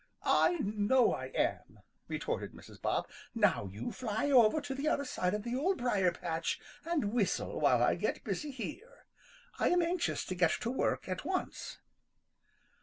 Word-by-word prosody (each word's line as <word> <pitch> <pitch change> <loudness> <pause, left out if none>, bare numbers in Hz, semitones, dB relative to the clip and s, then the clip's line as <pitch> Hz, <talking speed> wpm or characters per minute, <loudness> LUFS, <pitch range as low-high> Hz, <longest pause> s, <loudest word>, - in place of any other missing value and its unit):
"I 350 - +4
know 215 +4 +3
I 130 - -4
am," 130 - -2 0.3
retorted - - -3
Mrs. - - -14
Bob. - - 0 0.3
"Now 100 - +2
you 105 +5 -5
fly 235 +3 -1
over 245 +2 +6
to 285 -2 -5
the 275 +3 -3
other 285 -2 +1
side 185 -6 -1
of 210 - -4
the 240 +1 -2
Old 360 +9 +1
Briar 205 -7 +2
patch 165 -1 -2 0.2
and 300 -11 -1
whistle 220 -6 0
while - - +4
I - - +4
get - - -2
busy 300 - -3
here. 390 - -8 0.5
I - - +3
am 355 -1 +3
anxious 345 +1 -1
to - - -3
get 175 -2 +3
to 235 - -1
work 265 - 0
at 185 -1 -3
once." 370 +4 -3
245 Hz, 170 wpm, -33 LUFS, 195-300 Hz, 0.5 s, over